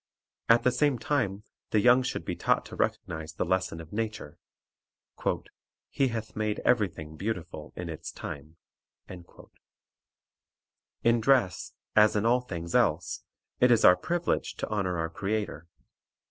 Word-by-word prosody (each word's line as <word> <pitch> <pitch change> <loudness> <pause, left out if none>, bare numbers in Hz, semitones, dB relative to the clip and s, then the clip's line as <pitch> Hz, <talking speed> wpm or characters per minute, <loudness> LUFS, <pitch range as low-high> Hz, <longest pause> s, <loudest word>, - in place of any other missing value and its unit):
At 115 +1 +6
the 125 - +4
same 145 0 +2
time 110 -6 -1 0.3
the 110 - +3
young 125 +4 +6
should 130 - -3
be - - -2
taught - - +1
to - - -9
recognize 80 0 -2
the - - -2
lesson 95 -3 0
of 80 +2 -11
nature, 110 -8 -4 1.5
"He 135 - +2
hath 115 -2 -5
made 105 -1 -1
every 110 -5 +4
thing 80 -2 -10
beautiful 90 -6 -5
in 90 - -5
its 80 -2 -6
time." 75 +3 -8 0.5
1 90 -1 -10 1.8
In 115 0 +4
dress, 120 -8 +2 0.2
as 105 0 +6
in 105 +1 +1
all 125 +2 +4
things 85 -8 -6
else, - - +1 0.4
it 125 - +5
is 115 -2 +5
our 90 - +9
privilege 175 - -1
to - - -4
honor 95 -4 -1
our 80 0 -1
Creator. 100 -4 -3
105 Hz, 145 wpm, -28 LUFS, 85-120 Hz, 1.8 s, our